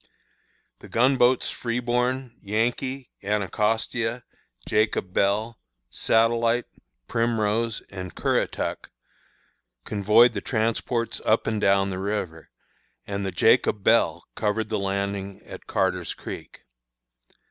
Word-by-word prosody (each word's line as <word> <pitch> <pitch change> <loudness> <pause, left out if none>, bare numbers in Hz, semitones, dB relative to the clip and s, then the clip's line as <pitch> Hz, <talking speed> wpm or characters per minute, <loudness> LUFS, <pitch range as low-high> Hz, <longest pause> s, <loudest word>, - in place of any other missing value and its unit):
"The - - -13
gun 130 +4 +3
boats 125 +1 +3
Freeborn, 125 +1 -1
Yankee, 120 +5 -2
Anacostia, 110 +4 -1 0.4
Jacob 105 -3 0
Bell, 110 +4 +1 0.3
Satellite, 115 +1 +2 0.4
Primrose, 115 -1 0
and 95 -2 -8
Currituck, - - -1 1.0
convoyed 105 +4 +4
the - - -3
transports 115 0 -1
up 110 - +2
and 110 -2 -1
down 100 0 +3
the 95 - -4
river, 95 -5 -3 0.6
and 100 0 -3
the 95 - -2
Jacob 95 +3 +3
Bell 85 -7 +3
covered 110 0 -1
the 110 - -1
landing 100 0 -3
at - - -11
Carter's - - 0
Creek. - - -9
110 Hz, 105 wpm, -25 LUFS, 100-115 Hz, 1.0 s, convoyed